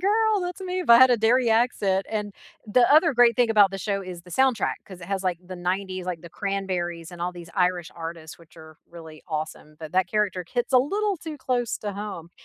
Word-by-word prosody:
girl! 430 +2 +2
That's 360 +1 -5
me!" 370 0 -3
if 350 - -1
I 235 - +10
had 260 0 +7
a 245 - +4
Derry 235 +2 +3
accent, 210 -4 +1
and 210 -2 -3 0.3
the 240 +3 +3
other 315 +1 +5
great 235 -2 +5
thing 245 -2 +3
about 205 -3 +5
the 195 - -5
show 195 0 -2
is 180 -2 -8
the 180 - -16
soundtrack 260 +4 +2
'cause 185 -2 -12
it 170 - -9
has, 195 0 -2
like, 180 -3 -1
the 185 - -7
'90s, 185 +1 -3
like, 180 -2 -4
The 170 - -10
Cranberries 180 -4 -3
and 170 - -7
all 180 - -1
these 170 -1 -11
Irish 180 -2 0
artists, 165 -1 -8
which 165 -1 -20
are 160 -1 -14
really 160 -2 -12
awesome, 155 -1 -5
but 155 -1 -9
that 185 0 +2
character 205 -4 -1
hits 245 +1 -1
a 255 - +7
little 400 +9 0
too 315 -1 -8
close 245 -3 -1
to 205 -1 -5
home. 200 -5 -7
195 Hz, 230 wpm, -25 LUFS, 175-245 Hz, 0.3 s, I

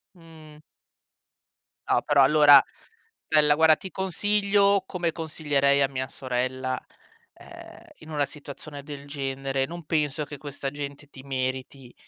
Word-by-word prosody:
Mh. 160 -3 -16 1.3
No, - - +3
però 145 -2 +3
allora 145 -1 +7 0.6
bella, 150 -1 +5
guarda, 160 0 +6
ti 190 - -9
consiglio, 200 +1 +1
come 175 -3 -2
consiglierei 145 -4 +1
a 135 - +4
mia 130 -1 -4
sorella, 130 0 -3 0.5
ehm, - - -14 0.2
in 160 - -14
una 145 -2 0
situazione 145 0 -10
del 145 -1 -9
genere, 135 -1 -3
non 170 +2 -9
penso 150 -1 -1
che 145 - -9
questa 140 0 -6
gente 145 0 -8
ti 135 -2 -14
meriti. 130 -1 -5
145 Hz, 130 wpm, -25 LUFS, 135-160 Hz, 1.3 s, allora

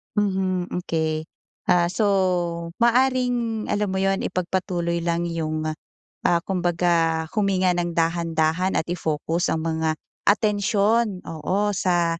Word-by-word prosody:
Mhm, 190 -3 0
hmm, 180 - 0
key. 160 -1 0 0.5
Ah, 175 -1 +4
so 185 +5 -1 0.8
maaaring 245 -2 +2
alam 205 0 +1
mo - - -2
yun, 195 0 +1
ipagpatuloy 175 -2 -1
lang 170 0 -1
yung, 155 -1 -2 0.6
ah, 170 -1 +3
kumbaga 170 -3 +1
huminga 195 -3 +2
nang 175 -1 -2
dahan-dahan 165 +1 +1
at - - +2
i-focus 160 0 -1
ang 160 - -2
mga 160 -1 0 0.3
atensyon, 210 0 +2
oo, 185 +6 -1
sa, 175 -3 +1
175 Hz, 120 wpm, -23 LUFS, 165-200 Hz, 0.8 s, Ah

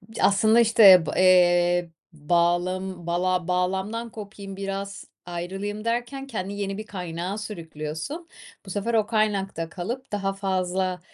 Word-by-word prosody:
Ya, - - -2
aslında, 215 +3 +5
işte, 205 -7 +7
b - - -3
eee, 175 -1 +4 0.2
bağlam 175 +3 0
bala 180 0 0
bağlamdan 190 +6 -1
kopayım 200 -2 -9
biraz, 195 0 -5 0.2
ayrılayım 195 +5 -5
derken 240 +4 -2
kendini 200 -4 -5
yeni 195 0 -3
bir 215 - -6
kaynağa 180 -1 -5
sürüklüyorsun, 165 - -6 0.4
bu - - -10
sefer 205 +5 -2
o 215 -2 +3
kaynakta 200 -6 0
kalıp 235 +10 -6
daha 195 -1 -1
fazla 185 -1 -1
195 Hz, 130 wpm, -25 LUFS, 175-210 Hz, 0.4 s, işte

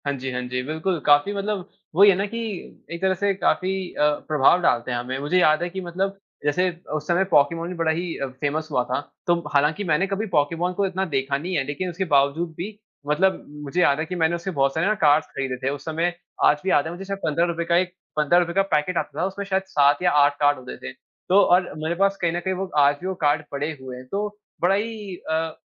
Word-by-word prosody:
हाँ 140 - 0
जी, 135 0 -4
हाँ 125 0 -2
जी, 125 0 -3
बिल्कुल। 160 +5 -2
काफ़ी 145 +7 +4
मतलब 200 -1 -3 0.3
वही 200 +3 +8
है 195 - +5
ना 195 +2 0
कि 230 +3 -5 0.5
एक 170 +1 -5
तरह 190 0 +3
से 200 +2 +1
काफ़ी 190 -1 +1 0.2
अ, - - 0 0.2
प्रभाव 155 +4 +4
डालते 125 -6 +1
हैं 120 - -1
हमें। 125 +2 -4
मुझे 150 +6 +1
याद 155 -1 +4
है 175 - -2
कि 190 +2 -5
मतलब 190 +3 -3 0.3
जैसे 180 +6 +2 0.3
उस 150 0 -4
समय 175 +2 +3
पोकेमॉन 165 +2 +3
भी - - -4
बड़ा 165 -1 +1
ही 170 +3 -2 0.3
फ़ेमस 155 +2 -1
हुआ 125 -3 +2
था। 125 +1 -2 0.3
तो 175 - +4 0.2
हालाँकि 150 +6 +2
मैंने 180 +2 +1
कभी 195 +3 -2
पोकेमॉन 165 +1 0
को 200 +2 0
इतना 190 0 -1
देखा 140 -4 -1
नहीं 175 +6 -4
है, 140 - +1
लेकिन 145 +7 -4
उसके 180 +2 -3
बावजूद 145 +5 +2
भी 205 +4 -6 0.3
मतलब 190 +6 +1 0.2
मुझे 150 +5 -1
याद 140 -3 +3
है 160 - -1
कि 180 - -5
मैंने 165 0 +2
उसके 175 +3 -4
बहुत 135 0 +2
सारे 160 +2 +1
ना 215 - +3
कार्ड्स 150 0 +4
खरीदे 135 -2 -3
थे - - +3
उस 145 - -12
समय। 165 +2 -1 0.3
आज 150 - +5
भी 190 - -1
याद 145 - +3
है 160 - -4
मुझे 180 +3 -7
शायद 195 0 -4
₹15 170 +2 0
का 170 0 +3
एक 180 0 0 0.2
₹15 170 +3 +2
का 195 - +3
पैकेट 170 +4 0
आता - - -3
था, - - +2
उसमें 195 +1 -4
शायद 190 0 0
7 145 -5 +3
या 180 - +4
8 145 0 +1
कार्ड 145 0 +3
होते 130 0 -9
थे 65 - -7 0.4
तो 190 +2 +6
और 180 -1 +3
मेरे 165 +2 -1
पास 195 +2 +2
कहीं 170 -2 +2
न 175 - -1
कहीं 190 - +1
वो 190 +1 -3
आज 145 0 +5
भी 185 - -4
वो 190 - -1
कार्ड 150 -2 +1
पड़े 145 +2 -2
हुए 130 -1 -7
हैं। 130 - -10
तो 205 +1 -1 0.3
बड़ा 180 +3 +4
ही 210 -2 -4
अ, 160 -1 -3
170 Hz, 245 wpm, -23 LUFS, 145-190 Hz, 0.5 s, वही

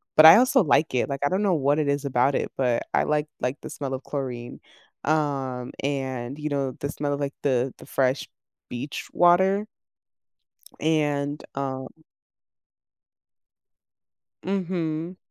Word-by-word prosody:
but 155 - +8
I 160 +4 +11
also 255 0 +4
like 155 -2 +2
it, 125 - +1
like, 140 0 -3
I 145 - +3
don't 190 +3 0
know 195 -3 +3
what 145 -2 +2
it 150 - 0
is 140 0 0
about 130 +1 +2
it, - - -1
but 125 -3 +1
I - - +3
like 150 0 0
like 125 +3 -2
the - - -7
smell 135 -2 -5
of 130 - -4
chlorine. 125 -4 -5 0.4
Um, 135 -5 -1
and, 135 -2 -3
you 150 0 -3
know, 140 -2 -1
the 140 - -3
smell 145 -1 -2
of, 140 - -3
like, 140 0 -2
the 130 -2 +1
the - - -13
fresh 130 +1 0 0.4
beach 125 +4 -5
water 190 +4 +4 1.1
and, 145 -2 0
um 130 -1 -3 2.6
Mhm. 175 -3 -2
145 Hz, 150 wpm, -25 LUFS, 130-155 Hz, 2.6 s, I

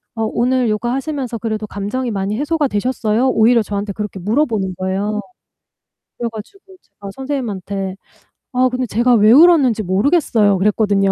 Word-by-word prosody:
"어 225 - -2
오늘 245 +2 0
요가 225 +3 -1
하시면서 270 -3 -3
그래도 215 -1 -3
감정이 210 +6 -3
많이 200 +1 -2
해소가 300 -1 0
되셨어요?" 225 +1 0
오히려 230 0 +4
저한테 200 0 -4
그렇게 210 -1 -5
물어보는 215 - 0
거예요. 195 +3 -2 1.0
그래 235 -1 -2
가지고 380 - -12
제가 200 -1 -11
선생님한테 200 -8 -4 0.6
"아 255 +1 +3
근데 255 0 -2
제가 240 +3 +2
왜 215 0 +5
울었는지 280 -7 +5
모르겠어요." 205 - +2
그랬거든요. 200 -1 +2
220 Hz, 390 characters per minute, -18 LUFS, 205-255 Hz, 1.0 s, 왜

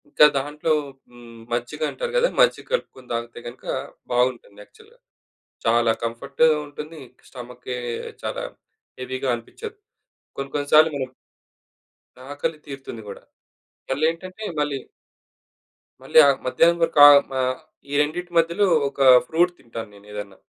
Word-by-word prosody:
ఇంకా 150 - +6
దాంట్లో 150 +3 -2 0.4
హ్మ్. 120 -1 -14
మజ్జిగంటారు 150 - -3
గదా - - +3
మజ్జిగ - - +3
కలుపుకొని 130 - -4
తాగితే 115 0 -4
గనుక 120 +2 -11 0.5
బావుంటుంది 120 -4 0
యాక్చువల్‌గా. 445 - -21 0.7
చాలా 115 0 +4
కంఫర్ట్‌ 135 +6 -1 0.2
ఉంటుంది 150 +2 -9 0.3
స్టమకే 125 0 -8 0.4
చాలా - - -3 0.6
హెవీ‌గా 130 +1 -4
అనిపిచ్చదు. 425 - -8 0.6
కొన్ని 135 0 -5
కొన్ని 145 -1 -1
సార్లు 155 +1 +7
మనం 130 -2 -4 1.2
ఆకలి 145 +2 -3
తీరుతుంది 135 -5 -8
గూడా. 100 - -9 0.7
మళ్లేంటంటే 165 +8 -2 0.2
మళ్ళి... 145 -2 -1 1.2
మళ్ళీ - - +5
ఆహ్, 140 -1 +3
మధ్యాహ్నం 170 +6 +3
వరకు 165 -2 +1
ఆహ్, 145 -1 +9
మ - - -7 0.6
ఈ - - -4
రెండిటి 175 +4 -3
మధ్యలో 170 +5 +3 0.2
ఒక 140 0 -6 0.3
ఫ్రూట్ 175 +2 +2
తింటాను 115 -3 -8
నేనేదన్నా. 105 -1 -9
140 Hz, 115 wpm, -23 LUFS, 120-160 Hz, 1.2 s, ఆహ్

